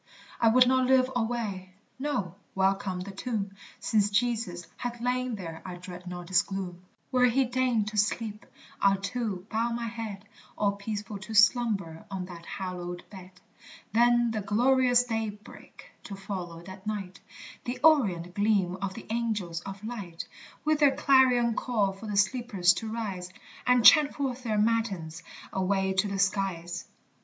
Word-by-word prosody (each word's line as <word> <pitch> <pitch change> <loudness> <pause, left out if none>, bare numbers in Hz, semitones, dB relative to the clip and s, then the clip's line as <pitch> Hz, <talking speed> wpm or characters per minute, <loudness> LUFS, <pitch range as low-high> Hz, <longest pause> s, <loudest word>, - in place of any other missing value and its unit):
I 230 - +4
would 250 +3 +6
not 260 0 +3
live 260 0 +4
alway 220 -6 -2 0.2
no, 230 - -2 0.2
welcome 190 -1 +1
the 195 +2 -6
tomb, 200 -1 -3 0.3
Since 210 -2 +2
Jesus 215 -5 0
hath 240 -1 -4
lain 250 0 -1
there 165 -5 -7
I 180 -1 -6
dread 180 0 -10
not 175 0 -7
its 180 - +6
gloom; 185 -3 -5 0.3
Where 250 -1 +5
he 260 +2 +3
deigned 245 -4 +1
to 215 - -7
sleep, 210 +1 -1 0.3
I'll 195 0 +5
too 200 -2 -3
bow 230 +2 +1
my 235 0 -2
head, 220 -3 -6 0.3
All 205 -1 +2
peaceful 205 0 -5
to 220 +3 -7
slumber 210 -7 +3
on 190 -2 -4
that 175 -2 -11
hallowed 180 -2 -5
bed. 185 -2 -10 0.6
Then 240 0 +4
the 215 -1 -2
glorious 245 +4 +3
daybreak, 220 -3 -6
to 200 - -6
follow 185 -4 -6
that 190 +2 -11
night, 195 -3 -4 0.5
The 245 +1 -3
orient 195 - +4
gleam 200 -3 +1
of 190 0 -4
the 230 - -9
angels 210 -8 -2
of 195 +2 -8
light, 200 -8 -6 0.4
With 310 -1 +2
their 280 -3 +5
clarion 255 -4 +4
call 215 -5 0
for 195 +3 -10
the 205 -1 -2
sleepers 200 -4 +3
to 220 +3 -5
rise. 195 -6 -4 0.4
And 250 -2 +4
chant 300 -3 +8
forth 265 -3 -2
their 220 -4 -1
matins, 210 -8 0 0.3
away 190 0 +1
to 190 +2 +1
the 200 -1 -3
skies. 190 -3 -1
210 Hz, 155 wpm, -28 LUFS, 190-240 Hz, 0.6 s, chant